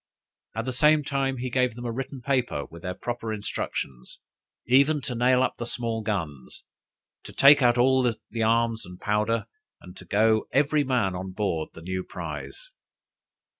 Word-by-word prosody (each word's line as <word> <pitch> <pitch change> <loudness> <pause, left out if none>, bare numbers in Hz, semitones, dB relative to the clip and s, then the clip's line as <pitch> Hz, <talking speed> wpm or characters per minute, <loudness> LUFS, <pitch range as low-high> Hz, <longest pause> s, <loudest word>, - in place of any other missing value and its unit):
At 115 +1 -2
the 130 - -2
same 150 +4 +4
time, 135 -2 -1
he 125 0 -4
gave 125 -2 +1
them 120 0 -7
a 120 - -2
written 135 +2 -5
paper 125 - 0
with 85 0 -13
their 90 0 -4
proper 115 +2 -4
instructions, 90 - -5 0.5
even 140 +5 +4
to 125 - -4
nail 125 +2 +3
up - - 0
the 120 - -3
small 115 -2 -2
guns, 80 - -4 0.6
to - - -10
take 140 +1 +7
out 120 -1 +4
all 130 +2 +4 0.3
the 115 - -3
arms 115 0 +2
and 90 0 -10
powder, 105 +2 0 0.3
and 90 0 -13
to 95 - -11
go 110 +4 +2
every 145 +2 +2
man 125 -8 +1
on 95 +1 -6
board 90 -6 -2
the 80 - -12
new 95 +1 -3
prize. - - -7
115 Hz, 170 wpm, -26 LUFS, 100-130 Hz, 0.6 s, take